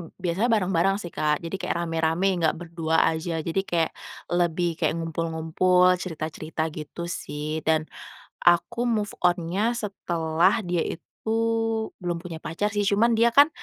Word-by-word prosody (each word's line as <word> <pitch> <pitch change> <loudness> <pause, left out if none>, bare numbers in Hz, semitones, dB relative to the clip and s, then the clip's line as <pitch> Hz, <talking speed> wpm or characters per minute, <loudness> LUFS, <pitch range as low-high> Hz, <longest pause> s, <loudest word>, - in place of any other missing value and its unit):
biasanya 185 +5 0
bareng-bareng 195 -4 +2
sih, 180 -4 -6
Kak. 150 +1 0
Jadi 170 +3 -4
kayak - - -2
rame-rame 165 +3 +1
enggak 160 -2 +2
berdua 165 -1 0
aja, 160 0 -3
jadi 165 +4 -1
kayak 165 -2 +1 0.4
lebih 175 -1 +1
kayak 160 -1 +1
ngumpul-ngumpul, 165 +2 +2
cerita-cerita 160 -2 -4
gitu 155 +2 -7
sih 155 -2 -4
dan 160 -1 +3 0.6
aku 175 +7 +3
move 220 -4 0 0.2
on-nya 180 +6 +2
setelah 185 -3 0
dia 175 -4 -1
itu 165 - -5 1.0
belum 175 -2 -3
punya 170 -2 -6
pacar 175 +7 -2
sih 205 -1 0
cuman 225 +4 +3
dia 230 +1 +5
kan, 285 +4 +7
170 Hz, 140 wpm, -25 LUFS, 160-195 Hz, 1.0 s, kan